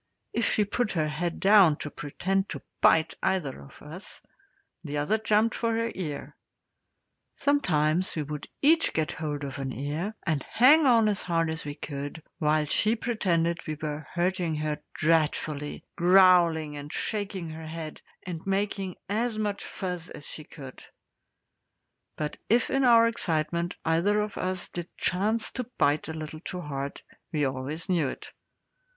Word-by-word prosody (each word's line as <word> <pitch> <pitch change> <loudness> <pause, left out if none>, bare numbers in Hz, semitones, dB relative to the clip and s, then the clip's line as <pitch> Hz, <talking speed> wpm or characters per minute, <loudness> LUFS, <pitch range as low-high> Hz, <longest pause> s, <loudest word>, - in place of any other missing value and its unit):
If 235 - +2
she 210 - +2
put 220 +2 -1
her 155 -4 +1
head 170 +3 -3
down 195 -5 +6
to 150 - -6
pretend 190 +8 -2
to - - -6 0.2
bite 160 0 +5
either 150 - -1
of 70 - -14
us, 165 +7 -10 0.6
the 150 -2 -4
other 155 +10 +1
jumped 215 +1 +2
for 230 -1 0
her 230 0 0
ear. 155 -6 -5 1.0
Sometimes 180 - +2
we 155 - -1
would 150 0 -6 0.2
each 320 +3 +4
get 155 -1 0
hold 150 -2 -4
of 140 0 -5
an 135 -1 -3
ear, 150 - -3
and 155 -6 +1
hang 280 - +5
on 230 -3 +5
as 205 -2 +1
hard 165 -2 0
as 160 0 -5
we 145 -1 -5
could, 145 +1 -6 0.2
while 150 0 +2
she 215 +9 +2
pretended 170 -8 0
we 155 -1 -3
were 155 0 -4
hurting 175 -2 0
her 150 0 -2 0.2
dreadfully, 155 -2 0
growling 175 -4 +5
and 145 +1 -7
shaking 195 -6 -3
her 160 0 -8
head, 160 -1 -7 0.2
and 170 -3 -5
making 195 -1 -1
as 220 +3 -1
much 205 -2 -2
fuss 180 -3 -4
as 145 - -9
she 155 - -7
could; 135 -5 -11 1.3
but 150 -1 -3
if 235 +2 +3
in 270 0 +2
our 230 -2 +7
excitement 170 -5 -1
either 170 +6 +2
of 210 0 -2
us 185 -1 -2
did 175 -1 -5
chance 215 +5 0
to 250 -2 -5
bite 145 +1 +2
a 160 - -4
little 155 0 -6
too 180 +2 -5
hard, 140 -2 -4 0.3
we 150 -3 +1
always 135 +5 -4
knew 175 -7 +2
it. - - -7
170 Hz, 160 wpm, -27 LUFS, 150-205 Hz, 1.3 s, our